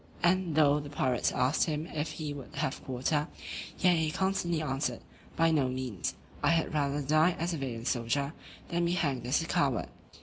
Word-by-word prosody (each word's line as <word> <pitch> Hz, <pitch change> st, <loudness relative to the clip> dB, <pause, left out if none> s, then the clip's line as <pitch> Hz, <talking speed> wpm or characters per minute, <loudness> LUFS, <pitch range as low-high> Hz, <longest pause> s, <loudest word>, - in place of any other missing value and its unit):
And 175 Hz, -2 st, +3 dB
though 150 Hz, -1 st, +5 dB
the 145 Hz, -1 st, -7 dB
pirates 130 Hz, -3 st, +1 dB
asked 130 Hz, +4 st, +2 dB
him 155 Hz, -1 st, -2 dB
if 155 Hz, -2 st, -3 dB
he 150 Hz, -2 st, -4 dB
would 140 Hz, +1 st, -9 dB
have 140 Hz, -1 st, -2 dB
quarter; 145 Hz, +4 st, 0 dB, 0.5 s
yet 180 Hz, -2 st, +4 dB
he 160 Hz, -1 st, +1 dB
constantly 190 Hz, -1 st, 0 dB
answered, 145 Hz, -2 st, -1 dB, 0.3 s
"By 165 Hz, 0 st, +4 dB
no 140 Hz, -5 st, +2 dB
means, 125 Hz, -7 st, -3 dB, 0.3 s
I -, -, +3 dB
had 165 Hz, -1 st, +2 dB
rather 145 Hz, -1 st, 0 dB
die 155 Hz, +5 st, +4 dB
as 170 Hz, +2 st, -1 dB
a -, -, -2 dB
valiant 120 Hz, -4 st, -4 dB
soldier, 140 Hz, +4 st, 0 dB, 0.4 s
than 170 Hz, 0 st, +1 dB
be 170 Hz, -, +1 dB
hanged 135 Hz, -8 st, 0 dB
as 140 Hz, +6 st, +2 dB
a -, -, -4 dB
coward." 135 Hz, -7 st, +1 dB
150 Hz, 190 wpm, -31 LUFS, 135-165 Hz, 0.5 s, though